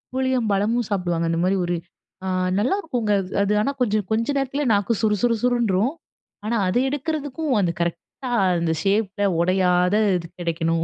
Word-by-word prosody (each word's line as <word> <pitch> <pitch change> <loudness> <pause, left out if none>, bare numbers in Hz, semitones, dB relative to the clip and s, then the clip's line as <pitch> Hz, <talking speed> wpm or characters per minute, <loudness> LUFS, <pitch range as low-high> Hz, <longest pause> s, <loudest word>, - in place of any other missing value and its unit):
புளியம்பழமும் 235 -3 +1
சாப்புடுவாங்க. 175 -4 -1
அந்த 165 - 0
மாரி 195 +1 +2
ஒரு, 175 0 -1 0.5
அ, - - -3 0.3
நல்லாயிருக்கும்ங்க. 250 - 0
அது 185 0 -9
அது 200 +1 +1
ஆனா, 280 +5 -1
கொஞ்சம் 210 -4 0
கொஞ்ச 230 +2 0
நேரத்துல 275 +2 -2
நாக்கு 205 +3 +1
சுறு 210 -1 +2
சுறு 230 -2 +3
சுர்ருன்றும். 240 -1 +2 0.5
ஆனா 235 - 0
அதை 205 +7 +1
எடுக்கிறதுக்கும் 290 0 -2
அந்த 175 -3 +1
கரெக்ட்டா 170 - -4 0.3
அந்த 170 -1 0
ஷேப்ல 205 0 0 0.2
உடையாத 180 +1 +2 0.2
இது 170 - -7
கிடைக்கணும் 165 -1 0
210 Hz, 150 wpm, -22 LUFS, 180-250 Hz, 0.5 s, சுறு